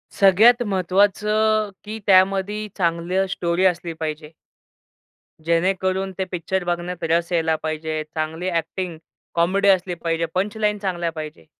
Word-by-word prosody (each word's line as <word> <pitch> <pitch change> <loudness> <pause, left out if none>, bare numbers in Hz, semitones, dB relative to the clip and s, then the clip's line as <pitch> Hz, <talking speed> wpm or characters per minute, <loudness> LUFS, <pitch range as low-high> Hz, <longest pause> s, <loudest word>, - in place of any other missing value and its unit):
सगळ्यात 210 +5 +6
महत्त्वाचं, 205 +3 +2
की 220 +1 -6
त्यामध्ये 195 +2 +3
चांगलं 175 +2 0
स्टोरी 175 0 0
असली 170 -2 0
पाहिजे. 155 -1 -5 1.1
जेणेकरून 190 +3 0
ते 190 - 0
पिक्चर 180 +1 -2
बघण्यात 175 0 -3
रस 170 +2 +1
यायला 160 -2 +2
पाहिजे. 155 0 -3
चांगली 160 +3 -3
अ‍ॅक्टिंग, 170 0 -3 0.4
कॉमेडी 190 +4 +2
असली 185 -1 +2
पाहिजे, 165 0 -1
पंचलाईन 210 +2 0
चांगल्या 175 -4 -2
पाहिजे. 155 - -8
180 Hz, 120 wpm, -22 LUFS, 165-195 Hz, 1.1 s, सगळ्यात